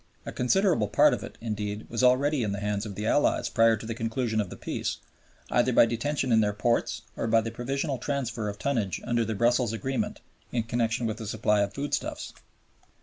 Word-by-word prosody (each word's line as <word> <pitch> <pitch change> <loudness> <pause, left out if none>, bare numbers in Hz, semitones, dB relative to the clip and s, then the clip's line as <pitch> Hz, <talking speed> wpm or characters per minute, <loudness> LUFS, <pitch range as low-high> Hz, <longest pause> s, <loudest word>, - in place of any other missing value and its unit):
A - - -5
considerable 160 - +2
part 105 - +5
of - - -3
it, - - -9
indeed, 105 -1 -4
was 115 - -2
already 135 +3 +4
in 105 -3 -1
the 100 - -3
hands 105 +1 -2
of 100 - -7
the 105 - -4
Allies 145 - +2
prior 115 0 +4
to 110 - -9
the 115 - -3
conclusion 115 0 -1
of 100 - -5
Peace, - - -3 0.5
either 125 +1 +3
by 120 - +6
detention 130 +3 -1
in 110 -1 +5
their 105 -1 +1
ports 115 +3 0
or - - -2
by 115 0 +4
the 115 +1 -4
provisional 135 +4 -2
transfer 120 -6 -2
of 100 - -6
tonnage 110 - -1
under 120 -1 +1
the 110 0 -2
Brussels 120 +1 +2
Agreement 130 +5 -2 0.3
in 120 -2 0
connection 115 +1 -1
with 110 -1 -2
the 110 -2 -6
supply 105 -1 +1
of 100 0 -2
foodstuffs. 145 +1 -3
115 Hz, 205 wpm, -27 LUFS, 105-125 Hz, 0.5 s, by